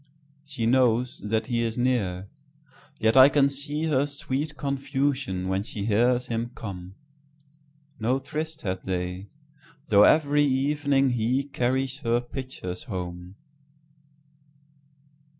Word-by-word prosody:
She 140 Hz, -6 st, -4 dB
knows 125 Hz, 0 st, +2 dB
that 110 Hz, +1 st, -1 dB
he 120 Hz, -1 st, -1 dB
is 115 Hz, 0 st, -2 dB
near, 100 Hz, -7 st, 0 dB, 0.7 s
yet 110 Hz, +2 st, +2 dB
I 130 Hz, +1 st, +9 dB
can 145 Hz, -1 st, +4 dB
seeHer 145 Hz, 0 st, -1 dB
sweet 145 Hz, +1 st, -4 dB
confusion 135 Hz, -8 st, -1 dB
when 95 Hz, +1 st, 0 dB
she 100 Hz, -1 st, -5 dB
hears 120 Hz, +3 st, +2 dB
him 115 Hz, 0 st, -3 dB
come.No 145 Hz, +6 st, -7 dB
tryst 155 Hz, +3 st, -5 dB
had 95 Hz, -2 st, -3 dB
they, 90 Hz, +1 st, -3 dB, 0.6 s
though 100 Hz, -1 st, +6 dB
every 145 Hz, +5 st, +5 dB
evening 140 Hz, 0 st, +2 dB
heCarries 130 Hz, +2 st, -1 dB
her 120 Hz, -3 st, +1 dB
pitchers 120 Hz, -7 st, -7 dB
home. 90 Hz, -1 st, -6 dB
130 Hz, 105 wpm, -26 LUFS, 110-145 Hz, 0.7 s, I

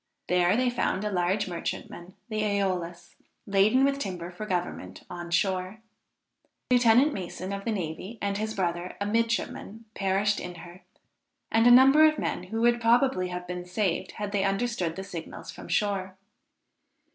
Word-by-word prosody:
There 180 Hz, +3 st, +3 dB
they 250 Hz, 0 st, +2 dB
found 210 Hz, -4 st, -1 dB
a 210 Hz, -, -1 dB
large 185 Hz, +2 st, 0 dB
merchantman, 175 Hz, +1 st, -6 dB
the 215 Hz, -2 st, -2 dB
Æolus, 185 Hz, -4 st, -2 dB, 0.3 s
laden 205 Hz, +7 st, +4 dB
with 275 Hz, 0 st, 0 dB
timber 180 Hz, -7 st, -5 dB
for 215 Hz, +4 st, -7 dB
government, 175 Hz, -, -4 dB
on 175 Hz, -1 st, -6 dB
shore. 185 Hz, +3 st, 0 dB, 0.9 s
Lieutenant 250 Hz, +4 st, +5 dB
Mason 185 Hz, 0 st, -5 dB
of 200 Hz, 0 st, -5 dB
the 230 Hz, -, 0 dB
navy, 185 Hz, +3 st, -4 dB
and 200 Hz, 0 st, -2 dB
his 220 Hz, 0 st, -3 dB
brother, 175 Hz, -2 st, -2 dB
a 200 Hz, -, -1 dB
midshipman, 225 Hz, 0 st, -2 dB
perished 195 Hz, +1 st, +1 dB
in 180 Hz, 0 st, -7 dB
her, 175 Hz, +2 st, -12 dB, 0.7 s
and 225 Hz, +1 st, +4 dB
a -, -, +8 dB
number 265 Hz, +5 st, +8 dB
of 310 Hz, -1 st, +5 dB
men 180 Hz, -, -3 dB
who 225 Hz, +4 st, -3 dB
would 240 Hz, 0 st, +3 dB
probably 235 Hz, -4 st, +3 dB
have 180 Hz, 0 st, -5 dB
been 180 Hz, 0 st, -5 dB
saved 185 Hz, 0 st, -2 dB
had 205 Hz, -1 st, -5 dB
they 200 Hz, -1 st, +1 dB
understood 195 Hz, -4 st, -1 dB
the 190 Hz, -, -5 dB
signals 175 Hz, -4 st, -8 dB
from -, -, -11 dB
shore. 190 Hz, +1 st, -1 dB
195 Hz, 160 wpm, -27 LUFS, 180-225 Hz, 0.9 s, a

